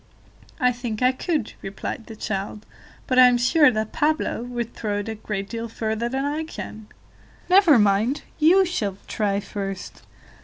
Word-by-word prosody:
"I 250 -3 +4
think 240 -2 -4
I 255 - +5
could," 290 - -2
replied 195 +3 -6
the 225 - -9
child, 210 0 -4 0.4
"but 255 -2 +2
I 255 - +10
am 245 -1 +4
sure 295 +5 +5
that 215 -2 -2
Pablo 305 -5 0
would 240 -1 -4
throw 210 -2 -3
it 205 +2 -4
a - - -2
great 210 -2 -5
deal 230 +1 -5
further 220 +1 -2
than 265 +2 -2
I 300 +2 -1
can." 220 -8 -8 0.6
"Never 365 -7 +7
mind, 210 +6 +2 0.2
you 360 +5 +6
shall 210 - -2
try 200 -2 0
first." 195 -2 -6
235 Hz, 165 wpm, -23 LUFS, 210-265 Hz, 0.6 s, I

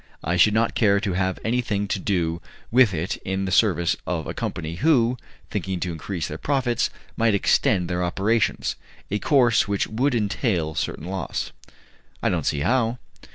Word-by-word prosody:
I 85 +3 0
should 105 +4 +5
not 115 +1 +2
care 100 -3 +3
to 100 -3 -2
have 95 0 0
anything 110 -4 0
to 100 - 0
do 85 -3 -1 0.3
with 125 -3 +6
it 85 0 -2
in 95 +1 -3
the 95 - -3
service 85 -5 +3
of 85 -4 -2
a - - -4
company, 85 0 -4
who, 125 - +3 0.4
thinking 95 -1 -2
to 90 - -1
increase 85 +1 -4
their 75 - -6
profits, 130 -4 0 0.3
might 115 -2 +2
extend 90 -2 +2
their 90 0 -1
operations 100 +5 0 0.4
a 105 - 0
course 120 -2 +3
which 100 -1 0
would 125 +4 0
entail 100 - 0
certain 80 - -3
loss." 95 -2 -3 0.7
"I - - +3
don't - - -1
see 70 - 0
how." 120 - +1
100 Hz, 170 wpm, -24 LUFS, 90-115 Hz, 0.7 s, with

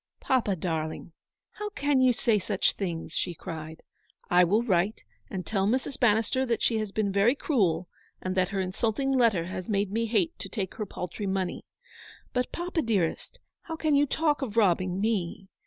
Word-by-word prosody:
" - - -58
Papa, 235 -7 +3
darling, 160 -1 -3 0.4
how 420 0 -5
can 290 -9 +1
you 255 -1 +6
say 230 -2 +2
such 195 +1 +1
things," 170 -5 -4
she 175 - -1
cried. 160 0 -7 0.3
" - - -37
I 180 0 +7
will 205 +7 +3
write 195 -1 +1 0.3
and 185 -2 -4
tell 195 -2 0
Mrs. 260 +4 -1
Bannister 230 +2 +3
that 240 -3 -1
she 225 -2 +2
has 215 -2 -3
been 205 -1 0
very 200 +7 +4
cruel, 185 - +1 0.3
and 185 - -3
that 185 -1 +2
her 200 -2 -2
insult 195 +5 -1
ing 270 0 +1
letter 230 -10 +3
has 185 +1 -6
made 200 -2 +1
me 230 +2 0
hate 210 -6 +1
to 195 - -5
take 195 -4 -3
her 215 - -3
paltry 180 +3 -5
money. 190 -2 -2 0.7
But, 250 0 0
papa, 345 -1 -2
dearest, 205 - -1 0.2
how 325 - -6
can 310 -2 +1
you 285 +1 +4
talk 300 +1 +1
of 230 -5 -4
robbing 185 -3 +3
me. 195 -3 -1
205 Hz, 190 wpm, -28 LUFS, 185-245 Hz, 0.7 s, I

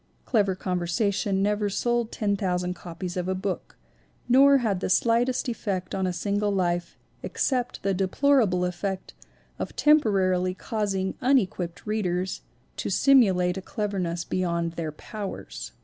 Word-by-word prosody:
Clever 200 -6 +2
con 180 -1 -2
versation 195 +3 0
never 210 0 +1
sold 240 +2 0
10,000 185 -4 -1
copies 175 0 -7
of 180 -1 -2
a 190 - 0
book 190 0 -4 0.5
nor 275 +3 +6
had 215 -7 0
the - - -2
slightest 235 +6 +2
effect 195 -6 -3
on 190 -1 0
a - - 0
single 205 +4 -1
life 175 -3 -1 0.2
except 250 -2 -1
the 195 0 +1
deplora 225 +6 +3
ble 180 0 0
effect 185 +2 -4 0.5
of - - -4
temporarily 190 -11 +3
causing 195 -3 -2
unequipped 190 -10 +1
readers 190 -4 -1 0.4
to - - -3
simulate 190 -10 +4
a - - -4
cleverness 185 -5 -2
beyond 170 -2 -1
their 165 -2 -4
powers. 205 +6 -7
195 Hz, 135 wpm, -26 LUFS, 180-220 Hz, 0.5 s, nor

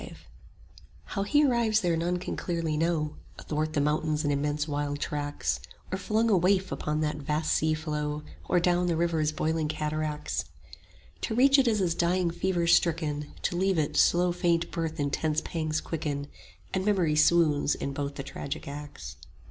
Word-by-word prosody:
V - - -9 0.9
How 195 - -4
he 295 +9 +3
arrives 235 -4 +2
there 175 -3 +1
none 175 +2 0
can 180 - -4
clearly 165 -3 -2
know; 155 -1 0 0.2
Athwart 155 0 -2
the 150 - +1
mountains 150 +1 +1
and 145 -1 +1
immense 145 +1 -1
wild 145 -1 -2
tracts, 145 0 -2 0.3
Or 190 - -1
flung 220 +4 +1
a 215 - +4
waif 185 +1 +2
upon 150 0 -2
that 150 -1 -1
vast 150 +2 -1
sea 155 0 +2
flow, 150 -1 -3 0.3
Or 180 - +4
down 175 0 +2
the 170 - +1
river's 160 -2 +1
boiling 155 0 -1
cataracts: 155 0 -2 0.8
To 220 - -2
reach 275 +3 +6
it 260 - +3
is 215 -3 +2
as 175 -3 +1
dying 175 +1 +1
fever 175 0 0
stricken 165 -3 +2
5 - - -18
To 175 - 0
leave 190 0 +2
it, 150 -2 0
slow 175 +1 +4
faint 175 -1 +1
birth 165 -1 -3
intense 150 +2 0
pangs 155 -2 -2
quicken; 145 -3 -3 0.5
And 190 - 0
memory 185 -7 +2
swoons 155 -2 +4
in 140 - -4
both 140 0 -3
the 140 - -5
tragic 140 +2 -6
acts. 145 +1 -8
160 Hz, 175 wpm, -28 LUFS, 150-175 Hz, 0.9 s, reach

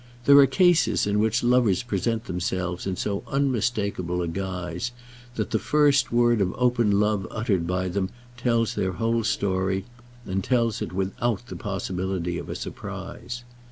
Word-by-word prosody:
There 140 0 +8
are 140 - +8
cases 170 - +3
in 105 0 +1
which 110 +3 +1
lovers 120 -5 +3
present 115 +1 -1
themselves 90 0 -2
in 95 - -1
so 100 +2 -2
unmistakeable 105 -9 0
a - - -2
guise, 90 +3 -3 0.5
that 110 - -2
the 110 - +2
first 145 -3 +3
word 120 -2 +3
of 90 -2 0
open 120 -5 +3
love 105 -2 +1
uttered 100 -7 -1
by 90 +1 -1
them 95 +1 -1 0.3
tells 115 -2 +1
their 95 -3 -1
whole 115 +4 0
story, 95 -2 0 0.4
and 95 0 -2
tells 115 -2 +1
it - - -3
without 100 +4 -1
the 125 - -8
possibility 95 -4 -3
of - - -8
a - - -4
surprise. 120 0 -7
105 Hz, 155 wpm, -25 LUFS, 95-120 Hz, 0.5 s, There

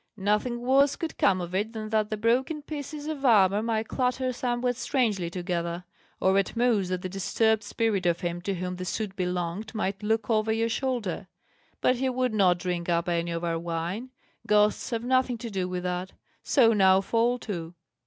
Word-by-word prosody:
"Nothing 210 +4 0
worse 270 +3 +4
could 330 - -5
come 190 -2 +4
of 175 0 -6
it 210 +4 -1
than 215 -1 -5
that 215 -1 +1
the 215 - -2
broken 255 +7 +1
pieces 290 0 -6
of 305 -3 -4
armour 205 -5 +5
might 220 -1 -1
clatter 255 0 0
somewhat 245 0 -1
strangely 230 - 0
together, 175 0 -3 0.4
or 190 +1 +3
at 195 - -2
most 230 -6 +2
that 185 0 -3
the - - -2
disturbed 215 +4 +1
spirit 205 -3 0
of 170 0 +1
him 175 0 -3
to 195 +2 -2
whom 180 0 -4
the 180 - -5
suit 200 +1 -3
belonged 180 +3 -3
might 200 -1 -2
look 220 0 0
over 220 -1 +1
your 225 +1 +1
shoulder; 230 -8 -2 0.5
but 255 - +3
he 265 +1 0
would 255 -2 0
not 185 -4 +4
drink 175 -1 -3
up 170 0 +1
any 170 -1 0
of 170 0 -3
our 165 -1 -1
wine 170 +8 -4 0.4
ghosts 210 0 +3
have 230 -2 -2
nothing 255 -1 +2
to 230 0 -7
do 185 -2 -2
with 180 0 -3
that. 180 +1 -3 0.3
So 230 -5 +4
now 190 -2 +5
fall 230 +4 +1
to!" 175 -7 -6
210 Hz, 195 wpm, -27 LUFS, 180-240 Hz, 0.5 s, armour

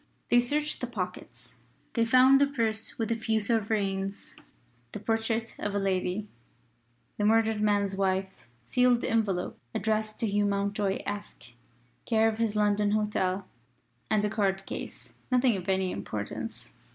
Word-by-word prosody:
They 240 - +6
searched 295 +5 -1
the - - -2
pockets. - - -6 0.4
They 230 -1 +2
found 255 +3 +6
a 285 - +5
purse 225 -5 -1
with 225 0 -1
a - - +2
few 220 -1 0
sovereigns; 200 -3 -1 0.6
the - - -4
portrait 225 +1 -1
of 205 0 -2
a - - +2
lady 195 +1 -1 0.9
the - - +1
murdered 220 0 +3
man's 205 -2 +2
wife 190 -3 -1 0.2
a - - -25
sealed 250 - +3
envelope 205 -6 0 0.2
addressed 215 -1 -1
to 225 - +2
Hugh 205 0 +1
Mountjoy, 200 0 0
Esq, 205 -12 -6 0.6
care 225 -1 +4
of 220 0 -1
his 225 -2 0
London 210 0 +2
hotel; 200 -3 0 0.6
and 215 -1 +2
a - - +1
card 195 -3 0
case: - - -7 0.2
nothing 250 -2 +3
of 185 0 -5
any 190 -1 +1
importance. 100 +1 -5
210 Hz, 150 wpm, -28 LUFS, 195-225 Hz, 0.9 s, They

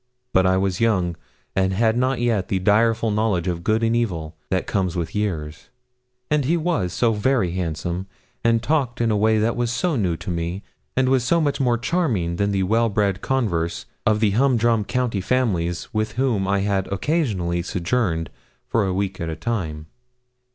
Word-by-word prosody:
But 95 0 +4
I 95 0 +3
was 95 0 -1
young, 95 -7 +2 0.4
and 95 0 +2
had 110 +3 +2
not 130 +1 +1
yet 115 -6 +1
the 95 - 0
direful 110 +3 +2
knowledge 105 -4 0
of 85 -1 -2
good 110 +3 +1
and 115 0 +2
evil 85 -9 -2
that 95 -1 0
comes 95 -3 -1
with 85 -2 -3
years; 80 -8 -3 0.6
and 150 -1 +3
he 165 +6 +2
was 160 - 0
so 115 +6 +2
very 105 -3 +1
handsome, 90 +1 -3 0.4
and 115 -1 +2
talked 130 -4 0
in 115 -1 +2
a - - +2
way 110 +1 +3
that 110 +2 +1
was 120 -1 0
so 165 +7 0
new 90 -8 0
to 90 - -5
me, 85 +3 -3 0.3
and 130 -1 +3
was 130 -2 +3
so 170 +8 +2
much 145 -3 0
more 120 -2 +2
charming 120 - 0
than 100 +2 +1
the 95 -1 +1
well 115 +4 +2
bred 100 -2 0
converse 90 -11 -1 0.2
of 105 0 +2
the 105 -2 +3
humdrum 120 -2 +2
county 120 -5 -1
families 90 -8 0
with 110 0 -1
whom 115 -6 0
I 100 0 +1
had 100 -1 0
occasionally 100 - 0
sojourned 85 -2 -1 0.3
for 105 -4 +1
a 95 - -1
week 95 -1 -2
at 85 - -2
a 80 - -3
time. 80 -5 -3
105 Hz, 185 wpm, -22 LUFS, 90-120 Hz, 0.6 s, But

